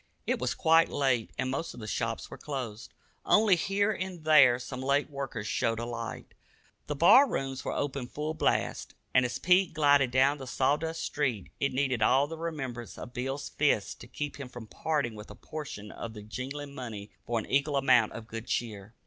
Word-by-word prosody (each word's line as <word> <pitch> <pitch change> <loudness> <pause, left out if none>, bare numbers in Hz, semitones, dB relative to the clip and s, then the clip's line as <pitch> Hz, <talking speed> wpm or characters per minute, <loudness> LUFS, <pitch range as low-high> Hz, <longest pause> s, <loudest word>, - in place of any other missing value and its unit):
It - - 0
was - - -1
quite 165 +1 +4
late, 130 -5 +1
and 130 0 -1
most 165 +5 -3
of - - -10
the 110 - -7
shops 115 +1 -3
were - - -7
closed. 125 -6 -5 0.3
Only 210 -3 +5
here 200 +3 +1
and 185 -5 -5
there 140 -6 +7
some 130 +1 -7
late 140 +2 +1
worker 135 -6 -4
showed 115 +2 0
a 115 - -3
light. 115 -1 -6 0.5
The 150 - -2
bar 250 - +7
rooms 135 -1 -3
were - - -2
open 135 -3 -2
full 150 +4 -4
blast, 155 - -1 0.2
and 130 -1 +5
as 125 - -2
Pete 180 -1 +3
glided 145 -4 +4
down 135 +3 +3
the 130 - -7
sawdust 155 +6 0
street 125 -10 -2
it 140 - +1
needed 130 -3 0
all 130 +6 +4
the 160 +2 -8
remembrance 135 -8 -5
of 120 - -9
Bill's 135 +3 -3
fist 140 -9 0
to - - -10
keep 145 +2 -5
him 135 -3 -7
from 120 -2 -9
parting 140 +1 -1
with 105 0 -10
a - - -10
portion 135 -9 -7
of 115 -1 -7
the 105 - -8
jingling 135 +6 -6
money 110 -6 -7 0.2
for 120 - 0
an 110 - -2
equal 140 +1 +1
amount 125 -5 +4
of 115 - -7
good 115 0 -7
cheer. 110 -2 -3
135 Hz, 200 wpm, -29 LUFS, 120-150 Hz, 0.5 s, there